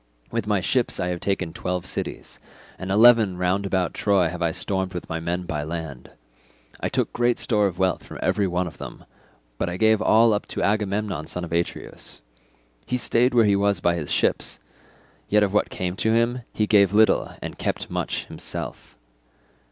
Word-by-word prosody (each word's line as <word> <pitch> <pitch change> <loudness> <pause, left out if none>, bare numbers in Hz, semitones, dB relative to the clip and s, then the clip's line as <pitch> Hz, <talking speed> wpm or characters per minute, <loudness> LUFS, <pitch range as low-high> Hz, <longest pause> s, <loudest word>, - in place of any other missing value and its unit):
With 105 - -2
my 105 -3 +1
ships 120 +8 +1
I 90 - -1
have 90 -1 -3
taken 90 -4 -2
twelve 90 0 -3
cities, - - -5 0.4
and 95 - -5
eleven 110 -2 +5
round 95 +2 0
about 95 -2 0
Troy 95 -5 +2
have 90 0 -7
I 85 - +2
stormed 95 +2 -2
with 90 - -5
my 80 - -3
men 85 +2 -2
by 80 -4 -3
land; 80 -4 -6 0.7
I - - -2
took - - -1
great 120 0 +2
store 105 -4 +2
of 90 -2 -5
wealth 95 -1 0
from - - -10
every 100 -2 +1
one 90 0 0
of 80 -5 -9
them, - - -9 0.5
but - - 0
I 90 - -4
gave 110 +1 +3
all 110 +1 +5
up 105 - -2
to - - -3
Agamemnon 100 -4 -1
son 90 - -4
of 85 - -7
Atreus. 85 -6 -4 0.6
He 125 - 0
stayed 125 +1 +2
where 115 -2 +6
he 100 -1 +4
was 100 -1 +2
by 85 - +2
his 80 -4 -4
ships, - - 0 0.7
yet 105 0 +4
of 100 -1 0
what 105 - +2
came 90 0 -3
to 110 - +1
him 115 +2 +1
he 110 - 0
gave 100 -2 +4
little, 110 -2 +3
and - - -7
kept - - -3
much - - -2
himself. - - -7
95 Hz, 190 wpm, -24 LUFS, 90-105 Hz, 0.7 s, where